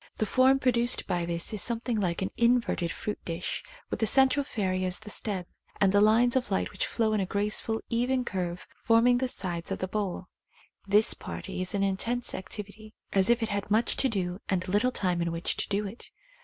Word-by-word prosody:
The 215 - +1
form 260 +4 +4
produced 245 -2 +2
by 175 -1 -1
this 170 +4 -2
is 210 - -1
something 235 +2 -1
like 180 -2 -1
an 190 - -3
in 240 +1 +4
verted 175 -7 -2
fruit 210 - -5
dish, 170 +1 -4 0.3
with - - -2
the 220 - +2
central 270 +4 +4
fairy 185 -7 -2
as 185 -1 +1
the 215 -1 -7
stem, 195 -5 0 0.3
and 195 -1 +4
the 205 +1 +4
lines 230 +4 +4
of 255 -4 0
light 190 - -1
which - - -2
flow 220 -2 0
in 215 - +1
a 190 - -1
graceful 210 +3 0
even 250 +2 0
curve 180 -3 -3 0.2
forming 235 +2 +4
the 260 - 0
sides 175 -8 -3
of - - -2
the 185 - -3
bowl. 200 -1 -3 0.6
This 210 +2 +4
party 195 -1 -6
is 185 +2 -1
in 200 - +1
intense 230 +5 0
activity, 210 +2 -8 0.2
as 195 +1 +3
if 235 0 +3
it 225 - -2
had 200 -1 -3
much 220 +3 +2
to 270 - +2
do 185 -4 -2
and 185 -2 0
little 205 +7 +2
time 180 -7 -1
in 170 0 -1
which 165 +1 -1
to - - -3
do 205 +1 0
it. 205 +4 -9
210 Hz, 215 wpm, -28 LUFS, 185-235 Hz, 0.6 s, form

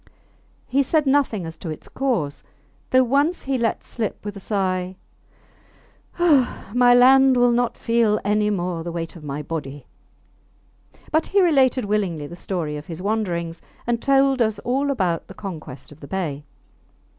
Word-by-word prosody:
He 275 +2 +1
said 300 +3 +1
nothing 265 -9 +1
as 165 -1 -8
to 170 - -6
its 155 - -7
cause, 210 - -2 0.5
though 255 0 +5
once 285 +7 +1
he 270 0 -1
let 230 -1 -1
slip 220 -3 -5
with 205 0 -5
a - - -7
sigh, 185 -2 -2 1.2
Ha! 290 - +2
my 245 0 +5
land 265 +1 +6
will 245 0 +4
not 240 0 0
feel 230 -2 +2
any 210 +1 +2
more 175 -4 -2
the 170 - -5
weight 165 0 -5
of 165 - -12
my 145 0 -5
body. 145 -3 -6 1.3
But 315 +1 +1
he 400 - +2
related 270 - +3
willingly 195 -7 -1
the 170 - -9
story 170 -5 -3
of 150 - -10
his 165 -1 -7
wanderings, 180 -5 -2 0.2
and 235 -1 -1
told 270 -1 +3
us 220 -2 +1
all 270 +3 0
about 185 -11 -1
the - - -12
conquest 160 -10 -8
of 150 - -14
the 140 - -10
bay. 150 -6 -3
210 Hz, 165 wpm, -22 LUFS, 170-260 Hz, 1.3 s, land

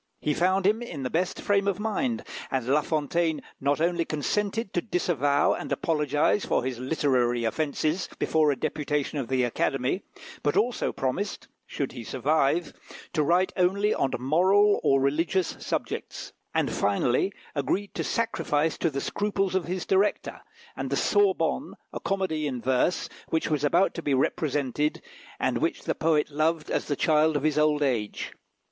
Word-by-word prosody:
He 150 - 0
found 185 +4 +2
him 215 +4 +3
in 150 - -6
the 125 - -3
best 180 +3 -1
frame 200 -1 +1
of 200 -1 0
mind, 225 +3 -1 0.3
and 130 -3 -1
La 145 +3 +3
Fontaine 155 +1 0 0.2
not 140 +2 +1
only 170 +1 +1
consented 200 +8 -2
to 175 - +1
disavow 145 - +1
and - - -6
apologise 150 +4 +1
for - - 0
his 125 -2 -3
literary 125 -4 +1
offences 155 - -1
before 155 -2 +2
a - - 0
deputation 150 0 -2
of 130 - -3
the 130 0 +1
Academy, 130 - 0 0.4
but 145 - +1
also 240 +2 +1
promised, 155 +11 -3 0.2
should 140 - -3
he 120 -3 -8
survive, 140 +6 +1 0.4
to 155 - +2
write 175 +5 +2
only 200 +4 +2
on 135 - +1
moral 185 - +4
or 135 - +3
religious 160 +6 +1
subjects; - - -4 0.2
and, - - 0
finally, 120 - +1 0.2
agreed 185 +8 -1
to - - -2
sacrifice 160 -9 0
to 165 - +2
the 140 -2 -3
scruples 195 -2 -1
of 190 -2 0
his 180 +1 -3
director, 195 +2 +1 0.3
and - - -4
the - - 0
Sorbonne, 410 -2 +1 0.2
a - - -4
comedy 185 -6 -1
in 130 -3 -3
verse, 130 +8 +1 0.2
which 160 -1 -1
was 150 -2 0
about 175 +6 +3
to 170 - -5
be 145 -4 +1
represented, 145 +1 0 0.4
and - - 0
which - - -1
the - - 0
poet 155 -2 +1
loved 155 +1 0
as - - 0
the 145 - 0
child 155 +1 +3
of 145 - -4
his 155 -1 +2
old 150 -1 +3
age. 115 -7 -1
155 Hz, 165 wpm, -27 LUFS, 140-185 Hz, 0.4 s, moral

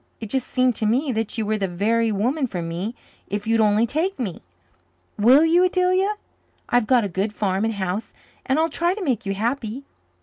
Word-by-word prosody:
It 220 -3 -7
just 265 -2 -1
seemed 255 -2 +2
to 215 - 0
me 260 +6 +1
that 225 -1 -2
you 220 - -1
were 215 0 -1
the 195 - 0
very 220 +5 +1
woman 255 +8 0
for 185 -6 -5
me 175 +8 -4 0.3
if 205 +1 -4
you'd 225 0 +2
only 215 +1 +4
take 320 - -1
me. 210 -10 -4 0.7
Will 255 +9 +6
you, 340 +2 +4
Adelia? 370 +3 +2 0.5
I've 245 -3 +2
got 250 -3 +4
a - - -1
good 195 +3 -2
farm 195 -1 -1
and 225 -1 -1
house, 190 +2 -3 0.3
and 265 +1 0
I'll 320 +1 +3
try 340 +3 0
to 415 - -5
make 250 - -1
you 195 - -1
happy." 235 +3 -2
230 Hz, 205 wpm, -22 LUFS, 205-280 Hz, 0.7 s, Will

